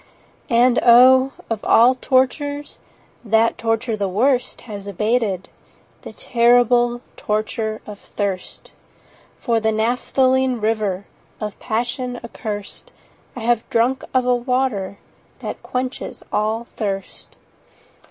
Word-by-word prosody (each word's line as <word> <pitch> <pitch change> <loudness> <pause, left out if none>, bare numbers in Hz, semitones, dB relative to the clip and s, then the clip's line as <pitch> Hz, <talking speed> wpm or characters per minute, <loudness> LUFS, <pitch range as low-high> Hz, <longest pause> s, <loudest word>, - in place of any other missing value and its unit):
30 235 - +1
And 245 0 +4
O! 255 +2 +7 0.2
of 225 -2 -3
all 240 +3 +6
tortures 285 +3 -1 0.4
That 225 0 +2
torture 225 0 0
the 200 -2 -1
worst 245 +6 +1
Has 205 -3 -8
abated—the 210 -1 -4
terrible 240 0 +3
Torture 215 +1 -2
of 205 -1 -9
thirst 195 -3 -5 0.7
For 230 -3 +1
the 220 0 +1
naphthaline 255 +3 +1
river 210 -3 -1 0.3
35 215 - -2
Of - - -34
Passion 245 +2 -3
accurst— 210 -3 -7 0.4
I 245 - -6
have 235 0 0
drunk 245 +3 +1
of 255 -1 +1
a 250 - +3
water 245 -6 -1 0.4
That - - -6
quenches 255 +1 -5
all 215 +3 0
thirst. 195 -3 -5
235 Hz, 115 wpm, -20 LUFS, 215-250 Hz, 0.7 s, O